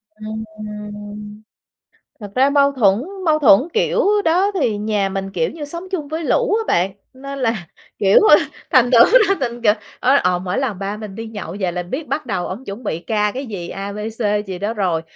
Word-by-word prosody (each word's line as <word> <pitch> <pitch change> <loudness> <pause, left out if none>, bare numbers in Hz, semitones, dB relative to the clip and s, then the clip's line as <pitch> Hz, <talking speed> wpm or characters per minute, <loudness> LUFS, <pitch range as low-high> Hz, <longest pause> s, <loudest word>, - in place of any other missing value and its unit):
Ừm. 210 -1 -8 0.8
Thật 205 -2 -8
ra 265 +2 +4
mâu 280 -1 +4
thuẫn 215 -4 +3 0.2
mâu 310 -2 +3
thuẫn 225 -9 +6
kiểu 445 - +1 0.2
đó 360 +5 +3
thì 230 -6 +1
nhà 205 -1 0
mình, 195 0 -4
kiểu 165 -3 0
như, 315 -3 -7
sống 340 +5 -7
chung 320 -7 -3
với 320 +2 -4
lũ 485 +3 +2
á 450 - +1
bạn. 185 +3 +1 0.2
Nên 275 +1 -7
là, 225 -8 -1 0.3
kiểu, 195 0 +5
ờ, - - +10 0.3
thành 245 -1 +4
thử 240 - +6 0.3
ra 390 - +4
thành 240 -2 -3
kìa 210 -2 +5 0.3
ơ, 265 +3 +4
ờ, 180 -1 +2
mỗi 180 +1 -3
lần 240 -8 -2
ba 200 +1 -3
mình 210 -2 -8
đi 225 +3 -6
nhậu 205 -5 -7
về 180 -2 0
là 180 0 -3
biết 265 - -5
bắt 300 - -2
đầu 190 -6 -2
ổng 205 +8 -6
chuẩn 200 +3 -7
bị 165 - -2
ca 210 +2 0
cái 265 +2 -4
gì, 190 -6 -6
A, 200 +1 -5
B, - - -8 0.2
C 210 -2 0
gì 190 -2 -5
đó 210 +4 -2
rồi. 180 -6 0
215 Hz, 215 wpm, -19 LUFS, 195-265 Hz, 0.8 s, ờ